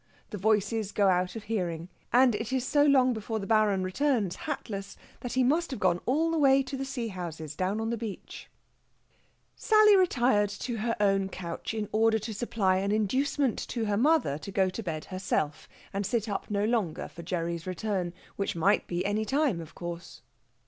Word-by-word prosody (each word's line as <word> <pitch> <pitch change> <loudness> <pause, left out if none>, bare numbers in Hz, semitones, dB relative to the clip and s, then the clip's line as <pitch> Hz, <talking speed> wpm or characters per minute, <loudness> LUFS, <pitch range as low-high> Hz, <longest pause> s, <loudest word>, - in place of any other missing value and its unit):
The 210 - -4
voices 210 +1 +1
go 200 -2 +3
out 180 +1 +1
of 225 - -6
hearing, 175 -7 -3 0.2
and 250 0 +5
it 225 +3 -3
is 260 -1 0
so 290 +1 +3
long 265 -3 +4
before 220 0 -3
the 200 - -4
Baron 210 -3 +3
returns, 205 -2 0
hatless, 200 -1 -5 0.2
that 245 - -5
he 255 - +3
must 320 +7 +2
have 260 - -5
gone 180 -2 +2
all 315 +6 +2
the 325 - 0
way 275 -1 +5
to 265 +1 -6
the 270 0 -3
sea 245 -4 -4
houses 160 -5 -6
down 190 +5 -1
on 225 +1 -2
the 235 - -1
beach. 215 -4 -7 1.1
Sally 430 -1 +5
retired 245 - +3
to 230 +4 -4
her 230 +2 -1
own 195 -1 +2
couch 180 +3 -5
in 215 -1 -2
order 220 +1 +3
to 220 +1 -5
supply 200 -4 +1
an 200 +1 0
inducement 255 +5 +1
to 230 -3 -2
her 205 -1 0
mother 250 - +2
to 200 - -8
go 190 -1 +2
to 225 - -5
bed 160 -6 -4
herself, 185 -5 -2 0.2
and 200 +1 -1
sit 220 +2 -1
up 205 - -4
no 205 0 0
longer 215 -9 -1
for 170 - -11
Gerry's 170 0 -3
return, 185 -1 -2 0.3
which 200 - -2
might 190 +5 +2
be 175 +1 -2
any 205 +2 0
time, 265 - +1
of 165 0 -12
course. 175 0 -7
210 Hz, 195 wpm, -28 LUFS, 185-245 Hz, 1.1 s, and